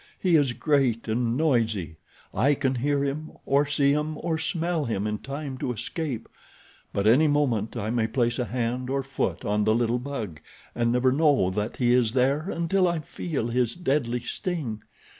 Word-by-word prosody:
He 180 -3 +2
is 140 -5 +3
great 130 -6 +1
and 115 +2 0
noisy. 115 - 0 0.4
I 145 +2 +3
can 130 -1 0
hear 140 +3 0
him, 150 +3 -4
or 140 +1 +3
see 140 -1 +3
him, 150 +1 -1
or 160 -1 -2
smell 165 0 -1
him 105 -4 -2
in 105 0 -2
time 140 -1 -6
to 125 - -1
escape; 125 0 -3 0.6
but 100 - -1
any 130 +9 +5
moment 125 -7 +1
I 110 -1 -2
may 115 -2 +1
place 120 +1 0
a 125 - 0
hand 125 +2 -2
or 135 0 0
foot 115 -10 -2
on 105 +1 +1
the 110 +1 +3
little 120 +1 +1
bug, 115 - -5 0.3
and 115 0 +1
never 125 +1 +3
know 140 - +3
that 105 +4 -3
he 120 -1 +3
is 120 -3 +3
there 140 +7 +1
until 180 +2 +1
I 170 -1 0
feel 150 -4 -3
his 120 -1 +1
deadly 135 -8 0
sting. 145 - -4
130 Hz, 180 wpm, -26 LUFS, 115-145 Hz, 0.6 s, any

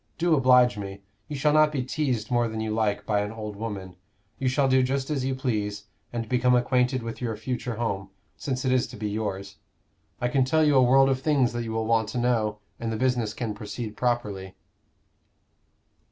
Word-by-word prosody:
Do 170 0 +2
oblige 125 -5 +5
me: 100 0 -7 0.2
you 150 - -5
shall 150 +2 +2
not 155 0 +5
be 135 -4 -1
teased 130 -4 -2
more 120 -1 +2
than 110 -1 -5
you 110 0 -2
like 105 -2 0
by 105 -1 +1
an 105 0 -2
old 105 -2 -6
woman: 100 -4 -6 0.4
you 135 - 0
shall 135 +2 +2
do 130 0 +4
just 135 +2 -1
as 140 -4 -1
you 130 0 -1
please, 105 -6 -2 0.3
and 115 -1 -3
become 125 +1 +3
acquainted 125 0 +1
with 115 +1 -6
your 115 -3 -2
future 120 +1 -3
home, 100 -4 -3 0.3
since 130 -1 -3
it 130 - +2
is 130 -1 +2
to - - -10
be 105 0 -3
yours. 100 -2 -4 0.6
I 120 - 0
can 130 +2 +2
tell 155 +5 +2
you 150 -1 +4
a 130 - +6
world 135 +2 +5
of 130 -1 0
things 135 -5 +2
that 120 0 -3
you 110 - -4
will 110 0 -1
want 110 -1 +2
to - - -4
know; 115 -4 +1 0.2
and 115 -1 -3
the 110 - -2
business 120 -3 0
can 115 -4 -3
proceed 105 +1 -6
properly." 105 -6 -2
120 Hz, 210 wpm, -26 LUFS, 105-130 Hz, 0.6 s, a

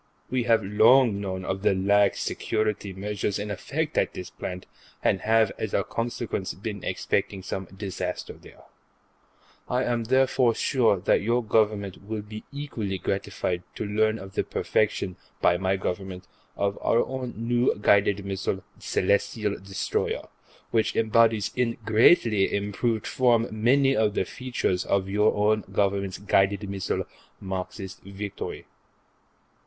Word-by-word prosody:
We 125 -2 0
have 115 -2 +4
long 105 +2 +5
known 95 -2 -4
of 95 0 -2
the 100 - +3
lax 100 +1 +3
security 110 -2 -1
measures 100 +1 -2
in 105 0 -4
effect 155 - -3
at - - 0
this 90 - -7
plant, 90 0 -6 0.4
and 95 - +2
have, 110 -1 +3
as 110 - -2
a 100 - +2
consequence, 115 -3 -3
been 100 0 -6
expecting 95 -2 -1
some 95 +1 -4
disaster 95 -1 -5
there. - - -16 1.1
I 125 +1 +1
am 120 -1 -1
therefore 130 -1 +3
sure 120 -7 +2
that - - +3
your 120 +3 +1
Government 105 -3 +1
will 105 +1 -4
be 105 +1 -9
equally 120 -9 -4
gratified 95 -1 -2
to - - -3
learn 110 +1 +1
of 95 -2 -10
the - - 0
perfection, 100 -4 0 0.2
by 90 - +4
my 95 +1 +1
Government, 95 0 -4 0.3
of 100 0 -1
our 115 - +3
own 130 -2 -5
new 120 +2 +1
guided 100 -1 +3
missile 95 -1 -2 0.2
Celestial 100 +2 0
Destroyer, 95 0 -2 0.4
which 110 -2 +1
embodies, 110 -1 +3
in 125 -2 0
greatly 110 - +4
improved 105 +2 -1
form, 120 -2 +3
many 135 +5 +3
of 110 -3 +2
the - - +1
features 120 -8 -2
of 95 -1 0
your 105 +2 +2
own 105 +1 +2
Government's 100 -1 0
guided 100 0 +2
missile 95 -1 -2 0.4
Marxist 95 0 -5
Victory. 100 +1 -6
105 Hz, 140 wpm, -26 LUFS, 95-115 Hz, 1.1 s, long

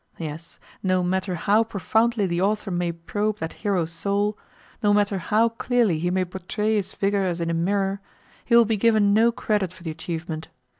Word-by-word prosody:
Yes, 160 0 -7 0.2
no 185 -1 +1
matter 185 +1 -1
how 205 +6 +3
profoundly 220 +1 +1
the 170 -1 -1
author 205 0 0
may 175 -1 0
probe 205 +6 -2
that 160 -4 -5
hero's 185 -6 0
soul, 200 +4 0 0.5
no 205 -2 +4
matter 205 -2 +1
how 220 +5 +2
clearly 230 -6 +1
he 175 +2 0
may 185 0 +1
portray 190 +4 -2
his 205 -3 0
figure 200 0 +1
as 180 -2 -1
in 170 0 -1
a - - 0
mirror, 195 +3 0 0.4
he 235 - +2
will 235 -1 +7
be 220 0 0
given 215 -2 +3
no 225 +3 +5
credit 210 -5 -1
for 185 - -15
the 165 - -3
achievement. 160 0 -5
195 Hz, 190 wpm, -24 LUFS, 175-210 Hz, 0.5 s, will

